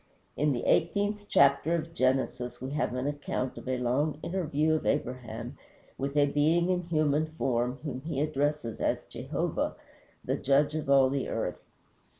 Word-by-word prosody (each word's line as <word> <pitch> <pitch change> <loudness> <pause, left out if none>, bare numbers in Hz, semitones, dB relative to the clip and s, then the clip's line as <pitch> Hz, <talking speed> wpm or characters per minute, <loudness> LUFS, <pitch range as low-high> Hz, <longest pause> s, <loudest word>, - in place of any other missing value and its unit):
In 150 +1 +2
the 120 -3 -2
eighteenth 205 +5 +1
chapter 140 +3 +4
of 165 0 -4
Genesis 130 -2 0
we 130 +2 -5
have 145 -3 -1
an 125 +1 -2
account 145 -3 -2
of - - -10
a 130 0 0
long 135 +5 0
interview 160 -4 0
of 155 - -1
Abraham 125 -2 -3 0.4
with 140 +2 -3
a 145 - +6
being 160 +5 +2
in 180 -1 +1
human 155 -2 +1
form, 125 -1 0
whom 135 -4 -4
he 150 -1 -3
addresses 145 -5 -1
as - - 0
Jehovah, - - -2 0.5
the - - 0
Judge 145 +2 +2
of 155 -3 -3
all 135 -1 +6
the 140 -2 -1
earth. 100 -6 -2
145 Hz, 160 wpm, -29 LUFS, 130-155 Hz, 0.5 s, a